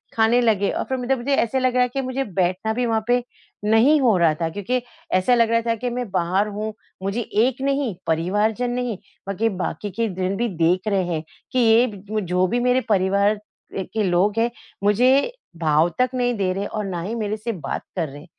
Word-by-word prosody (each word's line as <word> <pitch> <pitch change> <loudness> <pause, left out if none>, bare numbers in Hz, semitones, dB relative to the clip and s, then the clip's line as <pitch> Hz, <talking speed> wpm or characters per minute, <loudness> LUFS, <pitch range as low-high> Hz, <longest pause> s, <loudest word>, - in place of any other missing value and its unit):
खाने 225 +2 +4
लगे। 210 -4 +2
और - - -2
फिर 260 - 0
मतलब 255 +1 0
मुझे 270 +3 0
ऐसे 260 +2 +1
लग 255 -1 +1
रहा 250 0 +4
है 250 - 0
कि 275 - 0
मुझे 260 +1 -2
बैठना 190 +1 -1
भी 245 +2 0
वहाँ 225 -2 0
पे 245 0 +2 0.4
नहीं 230 +8 +5
हो 230 -6 +4
रहा 170 -3 +4
था 165 - +1
क्योंकि 205 +8 -2 0.3
ऐसा 185 +7 +4
लग 230 -1 +3
रहा 230 0 +3
था 230 - +2
कि 245 +3 -3
मैं 245 -2 -4
बाहर 185 +3 +1
हूँ 210 +1 -4 0.3
मुझे 200 +5 -1
एक 240 +4 0
नहीं, 275 -6 0
परिवारजन 205 +9 +1
नहीं 245 -4 -2 0.3
बल्कि 205 +3 0
बाकी 200 +1 -4
के 230 +5 -1
दिन 185 +1 -1
भी 240 - 0
देख 180 +5 +2
रहे 195 -3 +2
हैं 155 -1 -2 0.3
कि 255 - +1
ये 230 +1 +5
जो 205 +2 -8
ब 215 - +1
जो 180 +1 +2
भी 240 +6 0
मेरे 250 +1 +2
परिवार 200 +1 +3
अ, - - -13 0.4
के 220 +3 -2
लोग 195 +4 +2
हैं 235 +1 +2 0.3
मुझे 255 - +4 0.3
भाव 160 0 +3
तक 255 -1 +3
नहीं 245 -1 +1
दे 185 -2 0
रहे 195 +2 -3
और 215 -1 -4
ना 180 -3 -3
ही 210 +7 -4
मेरे 215 -1 -2
से 230 +2 -3
बात 180 -8 -4
कर 170 -4 -1
रहे। 145 +3 -11
220 Hz, 220 wpm, -22 LUFS, 190-245 Hz, 0.4 s, नहीं